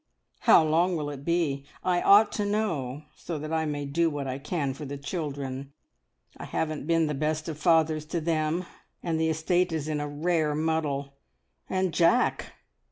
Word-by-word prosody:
"How - - +6
long 170 +4 +2
will 145 -1 -3
it 140 -1 -8
be? 160 -4 0 0.2
I 180 -1 +2
ought 205 +2 +6
to 210 - -1
know, 165 -10 -1
so 165 -2 -5
that 155 +2 -5
I 160 -1 +1
may 145 -1 -3
do 165 +4 +1
what 145 -2 -4
I 130 0 -3
can 145 -2 -2
for 150 - -9
the 140 0 -5
children. 140 -3 -5 0.6
I - - -7
haven't 155 -2 -3
been 165 -1 +3
the 150 - -1
best 155 +2 -1
of 155 -2 -5
fathers 160 -2 +3
to 170 +1 -2
them, 160 +2 0 0.4
and 165 -2 -1
the 160 0 +2
estate 175 +3 +1
is 155 -2 -2
in 155 -1 -1
a 145 - -3
rare 155 0 0
muddle. 145 -3 -1 0.5
And 185 -2 0
Jack! 170 +8 +2
155 Hz, 180 wpm, -27 LUFS, 145-170 Hz, 0.6 s, How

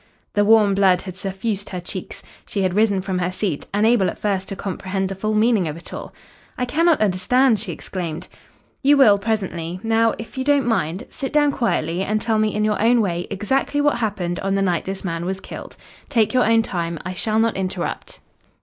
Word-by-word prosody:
The 205 - +3
warm 210 -1 +5
blood 190 -2 +3
had 185 -2 -7
suffused 195 +2 -3
her 180 - -4
cheeks. 180 +1 -7 0.2
She 200 - -1
had 185 -1 +1
risen 205 -1 +2
from 185 -1 -2
her 180 0 -1
seat, 185 -5 -3
unable 210 -1 +3
at - - -7
first 195 -2 -1
to 195 - -4
comprehend 190 0 -3
the - - -3
full 215 +3 -2
meaning 215 -4 +3
of 155 +1 -5
it 170 - -10
all. - - -7 0.5
"I 250 - 0
cannot 325 +6 +2
understand," 215 +5 +3
she 225 - -3
exclaimed. 175 -2 -5 0.5
"You 285 +1 +5
will 210 -7 +6
presently. 185 -5 -2
Now, 225 0 +2
if 225 +4 -8
you - - 0
don't 285 -1 +3
mind, 185 -6 -1
sit 270 - -4
down 295 -1 +3
quietly, 185 - -1
and 215 +2 0
tell 220 0 0
me 215 0 +2
in 210 0 +1
your 210 -1 0
own 235 +2 +4
way 175 -5 -1
exactly 265 +8 -1
what 290 -3 +2
happened 195 -6 -2
on 195 0 -1
the 195 - +1
night 175 -3 0
this 195 +1 -5
man 165 -2 -3
was 190 +2 -3
killed. - - -9 0.3
Take 230 -6 +2
your 250 -2 +3
own 225 0 +4
time. 170 -4 -3
I 185 - -3
shall 215 +4 0
not 225 0 +2
interrupt." 185 -2 -4
200 Hz, 210 wpm, -21 LUFS, 185-225 Hz, 0.5 s, will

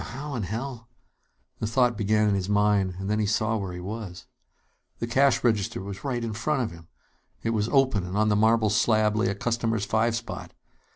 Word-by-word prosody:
"Now, - - -6
how 140 +4 -6
in 120 - -2
hell 115 +4 -5 0.4
" - - -44
The 110 - -1
thought 120 +1 +2
began 105 0 +2
in 105 - +2
his 95 0 -1
mind; 105 -2 +2
and 95 +1 -5
then 105 +1 0
he 105 - +1
saw 110 +2 +1
where 100 -3 -4
he 90 - -7
was. 95 -1 -7 0.7
The - - -2
cash 135 +3 +3
register 110 -5 +1
was 100 0 -7
right 125 -4 -2
in 115 -2 -3
front 130 +5 0
of 115 - -4
him! 85 -1 -13 0.6
It 115 - 0
was 110 0 0
open, 130 -8 +3
and 95 +3 -3
on 110 0 +3
the 105 - +3
marble 110 0 +3
slab 110 0 +3
lay 110 +2 +1
a 100 - -1
customer's 115 -1 -1
five 115 +2 +1
spot. 115 0 -6
110 Hz, 220 wpm, -26 LUFS, 105-115 Hz, 0.7 s, cash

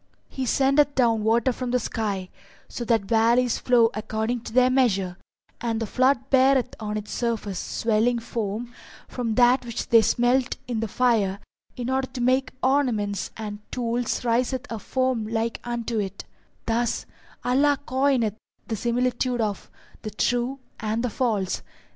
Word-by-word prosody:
P: - - -19
He 260 - -1
sendeth 275 +3 +3
down 230 -4 +3
water 230 +3 +3
from 250 0 -4
the 250 +1 +2
sky, 200 -6 -3 0.4
so 240 - -5
that 225 -3 +2
valleys 230 +3 +2
flow 235 -2 +4
according 220 +2 -2
to - - -8
their 255 +1 +5
measure, 195 -9 +2 0.5
and 230 -1 -1
the 225 - -1
flood 255 +3 +1
beareth 265 -1 +4
(on 210 -1 -3
its 210 0 -6
surface) 220 -5 -2
swelling 230 +2 +1
foam 230 +1 -4 0.3
from 230 -3 -3
that 245 +2 +5
which 235 -1 -5
they 230 -1 +7
smelt 245 +3 +2
in 240 -3 -2
the 225 - -1
fire 215 -4 +1 0.4
in 245 -1 -4
order 265 0 0
to - - -5
make 255 +2 +2
ornaments 230 -8 +1
and 210 -2 -5
tools 240 0 -1
riseth 250 +3 +1
a 225 - -3
foam 255 -1 -1
like 225 +1 -2
unto 235 -1 -2
it 200 -1 -4 0.4
thus 230 0 0 0.4
Allah 280 +3 +3
coineth 255 -5 +1 0.3
(the 225 - -2
similitude 245 +2 0
of) 210 -3 -2 0.3
the 215 - -5
true 245 +5 0 0.2
and 220 +2 -1
the 250 - -1
false. 210 -7 -1
235 Hz, 155 wpm, -25 LUFS, 220-255 Hz, 0.5 s, they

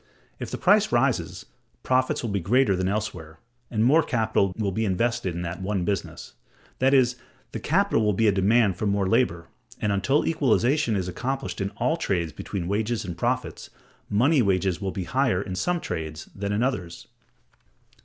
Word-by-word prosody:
If - - -5
the - - -4
price - - +3
rises, - - 0 0.4
profits 130 0 +1
will 115 - -2
be 100 - 0
greater 105 +3 +2
than 95 0 -1
elsewhere, 90 -6 -4 0.3
and 110 -1 +1
more 150 +6 +5
capital 110 - +1
will 105 -3 -1
be 110 +4 -1
invested 110 -1 0
in 85 - -4
that 90 +2 -5
one 95 -2 -1
business; 100 -3 -4 0.5
that 130 +1 +3
is, 125 -2 +3 0.3
the 115 - -5
capital 165 - +1
will 105 - +3
be 110 +3 +2
a - - +5
demand 100 0 +2
for 105 - -1
more 100 -1 +1
labor, 95 -7 +1 0.3
and, 105 - 0
until 100 +9 +1
equalization 135 -4 +2
is 95 -2 -2
accomplished 95 -1 -4
in 95 - -1
all 160 - +1
trades 85 - -1
between 90 -4 -5
wages 110 +3 -1
and 90 -3 -5
profits, 125 +7 -2 0.4
money 130 +8 +3
wages 95 -3 +1
will 95 - -2
be 95 - -4
higher 130 -2 +1
in 95 -1 -5
some 175 - 0
trades 80 - -5
than 100 0 -4
in 105 +3 +1
others. 90 -10 -3
105 Hz, 180 wpm, -25 LUFS, 95-125 Hz, 0.5 s, more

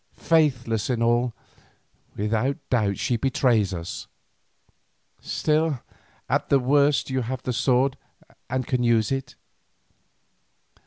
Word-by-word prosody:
Faithless 130 -10 +1
in 120 -2 0
all, 120 +1 +2 0.8
without 110 +7 0
doubt 105 -5 +1
she 120 - 0
betrays 120 -5 +2
us. 85 -2 -6 1.1
Still 155 -2 0 0.5
at - - 0
the 140 - +5
worst 140 -1 +2
you 130 0 0
have 130 +2 -4
the 125 - -2
sword, 130 +2 +1 0.5
and 130 0 -1
can 125 0 0
use 115 -2 +2
it." 135 -1 -3
125 Hz, 110 wpm, -24 LUFS, 115-135 Hz, 1.1 s, the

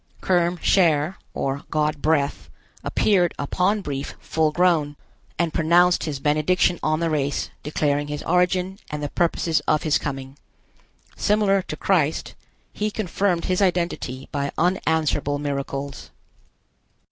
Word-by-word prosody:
Kerm 175 -1 +1
Cher, 165 -1 +3 0.2
or 135 +1 -2
God 150 -1 0
breath, 150 -2 0 0.3
appeared 180 -5 +2
upon 185 +8 0
Brief 140 -5 -5
full 160 -1 0
grown, 160 -3 +2 0.4
and 170 -2 0
pronounced 175 +2 +3
his 145 -4 -3
benediction 155 +5 +2
on 155 0 +1
the 165 - +1
race, 145 -2 -1
declaring 145 -1 0
his 150 0 -5
origin, 180 +2 +1
and 150 0 -4
the 145 - -2
purpose 165 0 +1
of 155 - +2
his 155 -2 +2
coming. 135 -1 -6 0.8
Similar 205 -2 +2
to 155 -4 -7
Christ, 160 -5 0 0.4
he 210 0 -1
confirmed 195 -4 -1
his 185 +1 0
identity 170 -8 -1
by 140 -1 -2
unanswerable 160 -5 +1
miracles. 140 -1 -4
160 Hz, 125 wpm, -23 LUFS, 145-180 Hz, 0.8 s, Cher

